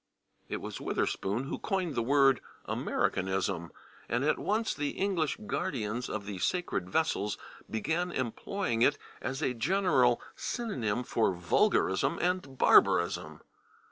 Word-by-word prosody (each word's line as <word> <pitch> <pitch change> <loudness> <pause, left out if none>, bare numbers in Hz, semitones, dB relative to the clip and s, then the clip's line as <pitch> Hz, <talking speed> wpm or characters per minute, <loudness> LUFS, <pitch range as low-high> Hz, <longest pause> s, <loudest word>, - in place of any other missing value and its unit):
" - - -41
It - - -3
was - - -6
Witherspoon 105 +6 -1
who 135 - -4
coined 185 -6 -1
the 115 - 0
word 135 +1 +4 0.3
/Americanism/ 95 -2 -1 0.4
and 120 +3 +1
at 155 - +2
once 220 +2 0
the 145 -1 -3
English 180 -7 0
guardians 125 - -2
of 105 -2 -4
the 100 -2 -5
sacred 90 - -1
vessels 105 -7 0 0.3
began 160 - -1
employing 130 - -2
it 145 +4 +4 0.2
as 135 +3 -3
a 125 - +1
general 130 - +3 0.2
synonym 125 - -2
for 110 -6 +1
vulgarism 95 - +2
and 175 -7 -1
barbarism. 85 -7 +4
130 Hz, 130 wpm, -30 LUFS, 105-175 Hz, 0.4 s, word